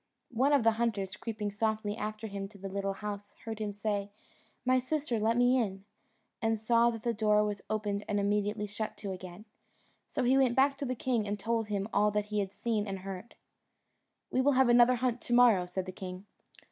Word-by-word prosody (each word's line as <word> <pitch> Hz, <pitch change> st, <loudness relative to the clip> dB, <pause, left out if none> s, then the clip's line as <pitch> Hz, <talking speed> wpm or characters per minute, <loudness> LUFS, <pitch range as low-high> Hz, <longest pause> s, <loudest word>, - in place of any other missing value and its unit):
One 260 Hz, +5 st, +3 dB
of 280 Hz, -4 st, +4 dB
the 225 Hz, -, +5 dB
hunters, 200 Hz, -5 st, -1 dB
creeping 210 Hz, -3 st, -4 dB
softly 215 Hz, 0 st, -1 dB
after 215 Hz, 0 st, -4 dB
him 200 Hz, -2 st, -4 dB
to 200 Hz, 0 st, -15 dB
the 195 Hz, 0 st, -6 dB
little 195 Hz, 0 st, -2 dB
house, 205 Hz, 0 st, -5 dB
heard 220 Hz, -1 st, -5 dB
him 210 Hz, -1 st, -2 dB
say, 205 Hz, 0 st, -2 dB, 0.6 s
"My 255 Hz, 0 st, +4 dB
sister, 255 Hz, -2 st, -1 dB
let 225 Hz, +2 st, +2 dB
me 245 Hz, +1 st, +4 dB
in," 195 Hz, -3 st, -4 dB, 0.6 s
and 225 Hz, 0 st, +1 dB
saw 235 Hz, +2 st, +4 dB
that 225 Hz, -2 st, -5 dB
the 235 Hz, -1 st, +1 dB
door 210 Hz, -1 st, +3 dB
was 205 Hz, -1 st, -2 dB
opened 210 Hz, -1 st, -2 dB
and 205 Hz, -1 st, 0 dB
immediately 205 Hz, +1 st, 0 dB
shut 210 Hz, +1 st, -5 dB
to 200 Hz, -2 st, -5 dB
again; 185 Hz, +2 st, -8 dB, 0.6 s
so 260 Hz, -, -2 dB
he 260 Hz, +2 st, +4 dB
went 255 Hz, -3 st, +3 dB
back 275 Hz, +1 st, +4 dB
to 280 Hz, -, -2 dB
the 255 Hz, 0 st, -2 dB
king, 230 Hz, -3 st, 0 dB
and 205 Hz, 0 st, -2 dB
told 225 Hz, +1 st, -1 dB
him 200 Hz, -1 st, -2 dB
all 210 Hz, +1 st, +4 dB
he 210 Hz, 0 st, -2 dB
had 195 Hz, -1 st, -2 dB
seen 215 Hz, -1 st, -1 dB
and 195 Hz, -1 st, -3 dB
heard. 195 Hz, +3 st, -8 dB, 1.0 s
"We 260 Hz, -, +2 dB
will 285 Hz, +2 st, +4 dB
have 260 Hz, -1 st, +4 dB
another 240 Hz, +1 st, +6 dB
hunt 245 Hz, 0 st, -1 dB
to 240 Hz, -, -3 dB
morrow," 230 Hz, -7 st, +5 dB
said 180 Hz, +1 st, -3 dB
the 185 Hz, -, -5 dB
king. 185 Hz, +1 st, -8 dB
215 Hz, 210 wpm, -31 LUFS, 200-235 Hz, 1.0 s, another